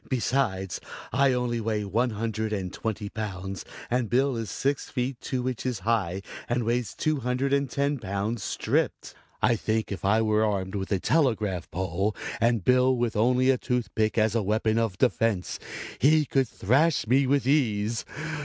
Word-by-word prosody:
"Besides 115 -8 0 0.3
I 135 +1 +4
only 125 -2 0
weigh 105 -1 -1
one 115 +6 +1
hundred 110 0 -2
and 95 -4 -3
twenty 110 -2 -3
pounds 100 -3 -5 0.2
and 120 -2 0
Bill 135 +2 +2
is 115 -3 -3
six 140 +7 -1
feet 125 -1 -3
two 130 -1 -2
inches 125 -3 -2
high 100 -3 0 0.3
and 120 0 +1
weighs 120 -2 -1
two 155 -1 0
hundred 125 +2 0
and 140 -1 +1
ten 140 +1 0
pounds 100 +2 -2
stripped. - - -1 0.3
I 120 - +5
think 110 0 -1
if 100 - -5
I 110 +3 +3
were 110 0 +2
armed 100 -3 -1
with 95 0 -3
a 100 - +2
telegraph 110 - +1
pole 95 +4 -1 0.2
and 115 -3 +2
Bill 125 0 +4
with 120 -2 -1
only 125 +4 +4
a 130 - 0
tooth 125 -4 -2
pick 110 0 0
as 110 -1 +3
a 115 - +2
weapon 110 +2 +1
of 110 -5 -1
defense 115 -5 +1 0.4
he 150 +3 +5
could 135 -2 +1
thrash 135 - +2
me 130 +4 +3
with 140 -1 +2
ease. 115 -6 +1
115 Hz, 170 wpm, -27 LUFS, 105-125 Hz, 0.4 s, I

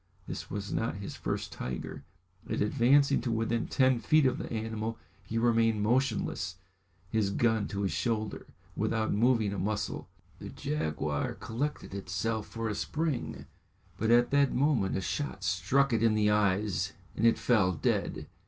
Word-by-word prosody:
This - - -6
was 100 0 -4
not 115 - -1
his 100 +1 -6
first - - -3
tiger, 65 0 -5 0.5
and - - -1
advancing 135 +6 +4
to 120 0 -2
within 115 +1 0
ten 130 -2 +3
feet 155 +4 +4
of 130 - +2
the - - -6
animal 110 0 -3 0.3
he 110 +5 -4
remained 115 -2 +3
motionless, 110 -5 0 0.6
his 110 -3 +1
gun 110 0 +1
to 100 0 -3
his 95 - 0
shoulder, 110 -3 -2 0.3
without 110 -1 0
moving 110 -1 +3
a 100 - -3
muscle. 105 +2 -2 0.3
The - - -7
jaguar 75 -1 -2
collected 135 0 -4
itself 100 +3 -2
for 115 0 -4
a 105 - -1
spring, 150 +4 -2 0.5
but 110 - 0
at 120 +1 +5
that 140 -1 +3
moment 125 -9 +2
a - - -1
shot 100 -3 -3
struck 130 +8 +2
it 110 - +2
in 115 -2 +4
the 105 -1 +3
eyes, 100 -2 +1 0.2
and - - -2
it 115 0 +5
fell 105 -7 +3
dead. 85 - -1
110 Hz, 160 wpm, -30 LUFS, 100-120 Hz, 0.6 s, at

